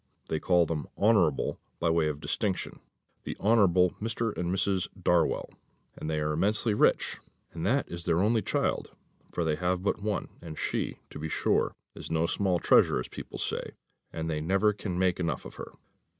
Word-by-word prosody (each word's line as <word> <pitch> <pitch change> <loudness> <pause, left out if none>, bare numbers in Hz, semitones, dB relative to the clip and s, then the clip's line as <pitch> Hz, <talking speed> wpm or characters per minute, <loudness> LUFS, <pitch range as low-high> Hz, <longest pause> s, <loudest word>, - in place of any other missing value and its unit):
They 80 - 0
call 90 0 +3
them 80 -2 -3
Honourable 100 -9 +3 0.2
by 85 -1 +2
way 80 -1 +2
of 75 -1 -3
distinction 95 +4 -2 0.4
the - - -5
Honourable 95 -5 +4
Mr. 115 0 -1
and 90 0 -1
Mrs. 95 0 +1
Darwell, - - +2 0.4
and 75 - -5
they 80 -1 0
are 75 0 0
immensely 105 +6 +1
rich; - - +2 0.3
and 80 - -5
that 135 +5 +2
is 85 0 -6
their 85 -1 +2
only 110 +3 +3
child, - - -1 0.4
for 85 - -1
they 80 -2 0
have 90 +1 0
but 100 - 0
one 105 -1 -2
and 80 -2 -8
she, - - -2
to - - -8
be 80 +1 -4
sure, - - +1 0.2
is - - -8
no 80 0 +1
small 95 +1 +1
treasure, 85 - +4
as 65 - -5
people - - -8
say, - - -3 0.4
and 80 0 -4
they 75 -2 -1
never 95 +6 +3
can 100 -3 -4
make 90 -1 +2
enough 85 -2 -2
of - - -10
her." - - -8
90 Hz, 185 wpm, -29 LUFS, 80-100 Hz, 0.4 s, Honourable